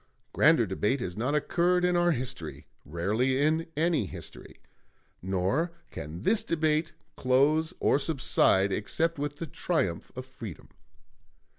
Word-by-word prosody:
Grander 155 -5 +5
debate 105 +7 0
has 90 -7 -5
not 130 +7 -1
occurred 180 +4 +2
in 180 0 +2
our 175 0 +3
history, 130 -4 -5 0.2
rarely 105 - 0
in 160 +3 +1
any 160 - +1
history; - - -11 0.6
nor 95 - -1 0.2
can 80 +6 -7
this 220 - +3
debate 155 -1 0 0.2
close 145 +5 +2
or 140 - +3
subside 130 -9 +2
except 160 +11 -1
with 145 0 -3
the 165 - -5
triumph 135 - -2
of 130 0 -6
Freedom." 125 - -10
140 Hz, 130 wpm, -28 LUFS, 105-160 Hz, 0.6 s, Grander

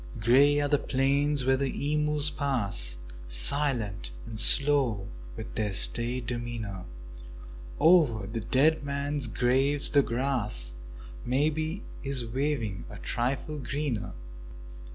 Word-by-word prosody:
Grey 140 +6 +3
are 145 - 0
the 145 0 +1
plains 140 +1 0
where 130 0 +2
the 140 +2 -2
emus 150 0 0
pass 100 - -2 0.3
Silent 100 - +3 0.2
and 110 -1 -9
slow, 135 -10 +3 0.3
with - - -9
their 105 - -2
staid 120 +6 +4
demeanour; 120 -5 -6 0.9
Over 150 - +3
the 115 +4 -5
dead 145 - +1
men's 140 -1 -2
graves 130 +5 0
the 140 - +4
grass 115 - 0 0.5
Maybe 155 - -2 0.2
is 135 -3 -2
waving 120 -4 -3
a - - -10
trifle 135 +5 -3
greener. 135 -3 -4
130 Hz, 110 wpm, -27 LUFS, 115-145 Hz, 0.9 s, staid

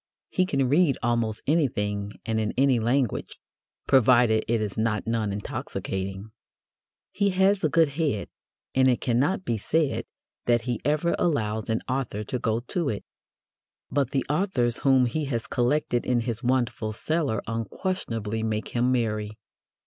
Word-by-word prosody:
He 185 -1 +1
can 135 -6 +1
read 145 0 +3
almost 115 -3 0
anything 105 -10 0
and 110 -1 0
in 110 -1 -1
any 135 -2 +4
language, 120 +1 0 0.5
provided 120 -4 +5
it 115 0 +1
is 105 -3 -3
not 110 -1 0
non 115 -2 0
intoxicating. 95 0 -4 0.8
He 200 0 +1
has 190 +1 +3
a 155 - +3
good 165 0 +4
head, 140 -8 -1 0.5
and 130 0 +4
it 125 -2 +3
cannot 140 +11 +1
be 115 -2 -1
said 155 +6 0 0.4
that 120 -1 +4
he 120 -1 -3
ever 150 +5 +1
allows 110 -10 0
an 110 - 0
author 130 -5 -2
to 125 +4 -3
go 115 0 0
to 155 +5 -2
it. 105 - -4 0.9
But 140 -4 +1
the 135 -2 -1
authors 145 - +1
whom 130 -2 +4
he 150 +6 -1
has 120 -5 -2
collected 125 0 0
in 120 -2 +2
his 115 -1 -3
wonderful 120 -4 0
cellar 145 -2 -1
unquestionably 115 - -3
make 110 -1 -2
him 125 +1 +1
merry. 110 -3 -1
120 Hz, 150 wpm, -26 LUFS, 110-140 Hz, 0.9 s, provided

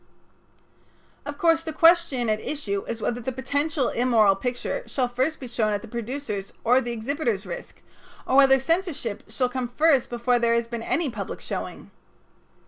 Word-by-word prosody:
Of 290 0 -5
course 330 0 +3
the 325 -1 -5
question 330 -6 +4
at 215 0 0
issue 200 -10 -3
is 230 -1 -4
whether 240 +1 -1
the 260 - -3
potential 285 +2 -1
immoral 225 -5 +3
picture 245 - -3
shall 255 -3 0
first 260 +6 -1
be 255 - -7
shown 220 -3 0
at 205 - -3
the - - -8
producer's 235 -3 -5
or 250 +3 +4
the 240 - -4
exhibitor's 235 -3 -2
risk, 175 -2 -8 0.4
or 260 - 0
whether 270 -1 +7
censorship 270 - -1
shall 250 +3 +1
come 250 -1 -3
first 280 +1 +3
before 240 +1 +1
there 235 0 +2
has 235 0 0
been 235 -1 -5
any 295 +4 0
public 205 -4 -5
showing. - - -6
245 Hz, 170 wpm, -25 LUFS, 230-285 Hz, 0.4 s, whether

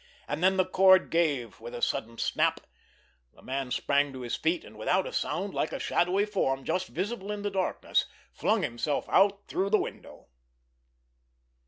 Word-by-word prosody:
And 175 - -3
then 190 +1 +4
the 185 - +3
cord 190 0 +5
gave 145 - 0
with 115 +1 -8
a - - -6
sudden 115 +1 -1
snap, - - +1 0.7
the - - -19
man 135 0 -3
sprang 140 +3 +1
to 130 - -7
his 120 -1 -3
feet, 165 +1 -1
and, 105 - -13
without 180 - +1
a - - -6
sound, 190 +4 -2
like - - -1
a - - -3
shadowy 185 +4 +1
form 135 -11 -1
just 185 +5 -1
visible 200 +3 -4
in 205 -1 -4
the 205 - -1
darkness, 190 -1 0 0.3
flung - - +1
himself 120 +5 -2
out 200 +1 +3
through 195 +1 -1
the 215 - +5
window. - - -7
180 Hz, 175 wpm, -28 LUFS, 135-195 Hz, 0.7 s, cord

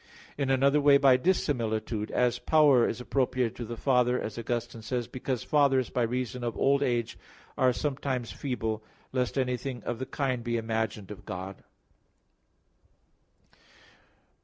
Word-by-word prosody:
In 140 -2 -1
another 140 +2 +3
way 140 -1 +7
by 135 -2 +6
dissimilitude; 115 - 0
as 125 -1 +1
power 145 -6 +4
is 115 - -4
appropriated 125 -2 0
to 120 - -5
the 115 +1 -6
Father, 125 -1 +2
as 105 - -5
Augustine 120 0 -4
says, 120 +1 -3
because 130 -1 -3
fathers 135 -4 +2
by 125 - 0
reason 125 +1 -2
of 120 -3 -3
old 140 +1 +3
age 120 -4 -1 0.4
are 130 -1 +3
sometimes 130 -3 -2
feeble; 110 -5 -3 0.3
lest 125 -4 -1
anything 125 -2 -2
of 120 -1 -3
the 130 - -4
kind 130 -4 -2
be 120 0 -1
imagined 110 -3 -3
of 105 - -9
God. 95 +1 -7
125 Hz, 140 wpm, -28 LUFS, 115-135 Hz, 0.4 s, way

